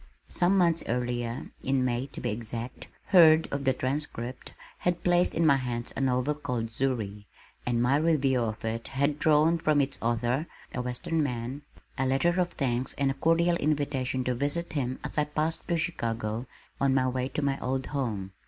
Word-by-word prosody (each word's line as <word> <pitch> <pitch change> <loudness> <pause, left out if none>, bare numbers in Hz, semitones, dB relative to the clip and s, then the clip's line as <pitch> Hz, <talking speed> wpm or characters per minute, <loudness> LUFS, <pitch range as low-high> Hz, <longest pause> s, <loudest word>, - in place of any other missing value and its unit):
Some 180 +3 +2
months 170 -3 +3
earlier, 120 0 -2
in 130 -1 +1
May, 125 +1 -1
to - - -9
be - - -1
exact, 115 +2 -5 0.2
Hurd 160 -4 +7
of 140 -1 -2
the 130 - +4
Transcript 130 -2 -4 0.2
had 175 -1 -1
placed 175 0 +3
in 165 - +2
my 140 -3 +6
hands 120 -2 -4
a - - -2
novel 130 +2 +1
called 125 -6 -3
Zury 110 -5 -2 0.4
and 120 -1 +2
my 135 +3 +3
review 145 -5 +2
of 110 -1 -3
it 115 +1 -2
had 140 +2 0
drawn 155 +2 +4
from 155 -2 +2
its 135 0 -1
author, 120 +6 0 0.3
a 125 - -2
western 125 +6 -2
man, 125 0 -3 0.4
a 135 - +2
letter 170 +7 +2
of 175 - 0
thanks 125 -2 -1
and 140 -1 +1
a - - -2
cordial 165 +4 +2
invitation 140 -4 0
to 125 - 0
visit 145 +7 -1
him 130 -4 -1
as 150 0 -1
I 150 - +2
passed 155 +2 -2
through 170 - +1
Chicago, 115 -7 -2 0.3
on 135 -1 +3
my 130 -1 +3
way 130 0 -1
to 145 +2 -2
my 140 -1 0
old 130 +1 -2
home. 110 -9 -3
135 Hz, 185 wpm, -28 LUFS, 120-150 Hz, 0.4 s, Hurd